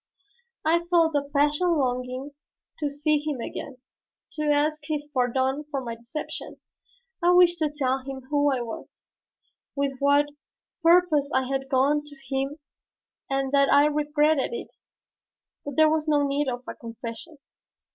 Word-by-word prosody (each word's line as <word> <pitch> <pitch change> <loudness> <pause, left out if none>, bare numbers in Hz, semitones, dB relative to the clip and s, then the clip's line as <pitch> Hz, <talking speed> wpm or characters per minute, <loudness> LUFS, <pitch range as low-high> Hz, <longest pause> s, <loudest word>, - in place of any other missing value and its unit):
I 330 +2 +4
felt 335 -2 +3
a 290 - +2
passionate 295 +5 +1
longing 255 +1 -2 0.5
to 295 -2 -1
see 295 +1 +1
him 295 -3 -3
again, 260 +3 -6 0.5
to 305 - -3
ask 300 +1 +2
his 295 -1 -3
pardon 260 +2 +1
for 285 -2 -2
my 235 -3 -5
deception. 235 +7 -7 0.6
I 350 +1 +4
wished 355 -1 +5
to 310 -2 +1
tell 270 -3 -1
him 265 0 -7
who 290 -1 +3
I 260 -2 -1
was, 230 -2 -6 0.9
with 275 -2 -2
what 285 +1 +4 0.6
purpose 330 -4 +4
I 260 - +3
had 270 0 -3
gone 280 +3 +2
to 295 -1 -13
him 270 +1 -3 0.7
and 270 -1 -1
that 280 -1 +4
I 285 +1 +6
regretted 300 - +1
it. - - -6 0.9
But 285 -2 -6
there 315 +2 +6
was 310 0 0
no 295 -2 +3
need 280 +1 0
of 245 -1 -3
a - - -4
confession. 230 +6 -9
285 Hz, 150 wpm, -26 LUFS, 265-305 Hz, 0.9 s, I